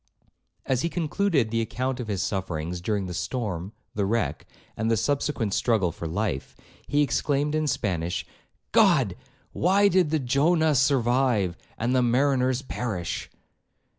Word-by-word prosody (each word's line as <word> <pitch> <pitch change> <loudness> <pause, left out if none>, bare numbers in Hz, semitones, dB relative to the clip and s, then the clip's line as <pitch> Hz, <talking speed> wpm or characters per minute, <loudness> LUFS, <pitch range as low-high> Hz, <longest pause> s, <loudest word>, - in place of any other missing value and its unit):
As 130 -2 +1
he 170 - 0
concluded 165 - 0
the 115 0 +1
account 130 +3 -2
of 120 - -4
his 100 -3 -1
sufferings 90 -4 -3
during 100 +1 -1
the 90 - -5
storm, 100 -2 -3 0.2
the 100 - -1
wreck, 115 +3 -1 0.3
and 110 +1 -1
the 115 - +3
subsequent 135 -4 0
struggle 105 -8 +2
for 85 0 -6
life, 80 - -3 0.3
he 145 +1 +3
exclaimed 145 +2 0
in 155 0 0
Spanish, 90 - -1 0.5
'God! - - +4 0.4
why 195 +3 +3
did 180 -4 +3
the 160 - +2
Jonah 155 +4 +2
survive, 125 - +2 0.2
and 120 +3 0
the 130 - +4
mariners 130 +1 +2
perish?' 105 -10 -4
125 Hz, 140 wpm, -26 LUFS, 100-145 Hz, 0.5 s, God